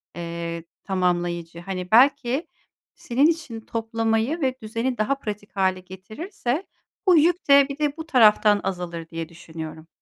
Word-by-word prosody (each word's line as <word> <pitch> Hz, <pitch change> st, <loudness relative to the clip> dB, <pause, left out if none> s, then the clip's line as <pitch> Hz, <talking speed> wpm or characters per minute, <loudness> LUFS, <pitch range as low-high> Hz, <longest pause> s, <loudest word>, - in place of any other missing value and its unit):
eee, 170 Hz, -1 st, -5 dB, 0.2 s
tamamlayıcı. 175 Hz, -3 st, -1 dB
Hani 180 Hz, 0 st, -5 dB
belki 265 Hz, +4 st, +4 dB, 0.5 s
senin 265 Hz, +4 st, +2 dB
için 315 Hz, -9 st, -2 dB
toplamayı 225 Hz, +6 st, -1 dB
ve 260 Hz, -2 st, +1 dB
düzeni 230 Hz, +3 st, -2 dB
daha 215 Hz, +6 st, +1 dB
pratik 210 Hz, -4 st, -7 dB
hâle 190 Hz, -1 st, +1 dB
getirirse 240 Hz, -, -5 dB, 0.4 s
bu 360 Hz, -2 st, +7 dB
yük 335 Hz, +1 st, +2 dB
de 280 Hz, 0 st, +7 dB
bir 280 Hz, -, -5 dB
de 295 Hz, 0 st, 0 dB
bu 320 Hz, -, -6 dB
taraftan 215 Hz, -6 st, +5 dB
azalır 175 Hz, -3 st, -4 dB
diye 165 Hz, -1 st, -5 dB
düşünüyorum. 160 Hz, -1 st, -9 dB
215 Hz, 140 wpm, -24 LUFS, 175-275 Hz, 0.5 s, bu